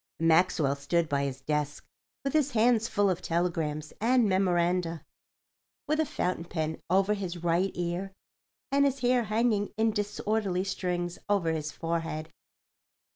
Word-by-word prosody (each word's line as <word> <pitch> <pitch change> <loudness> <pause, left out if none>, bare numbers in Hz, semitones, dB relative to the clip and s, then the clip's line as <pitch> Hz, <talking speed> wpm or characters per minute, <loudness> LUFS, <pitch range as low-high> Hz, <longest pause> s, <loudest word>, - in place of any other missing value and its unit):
Maxwell 160 -3 +3
stood 160 +4 0
by 140 -1 0
his 135 -1 -5
desk 150 +1 -2 0.4
with 275 - -2
his 295 -3 +2
hands 230 0 +3
full 205 -2 +2
of 185 -2 0
telegrams 165 -3 -1
and 240 0 +4
memoranda, 180 -3 +1 0.8
with 305 +2 +1
a 315 - +2
fountain 180 -6 -2
pen 160 -2 -3
over 195 +3 +3
his 180 -4 -5
right 175 +3 +2
ear 175 +2 -2 0.6
and 280 +1 +4
his 275 -1 0
hair 245 -1 +3
hanging 215 -1 +1
in 220 0 +3
disorderly 205 -2 -1
strings 180 -2 -2
over 190 -5 +2
his 155 -2 -3
forehead. 165 -1 -3
180 Hz, 140 wpm, -29 LUFS, 165-215 Hz, 0.8 s, and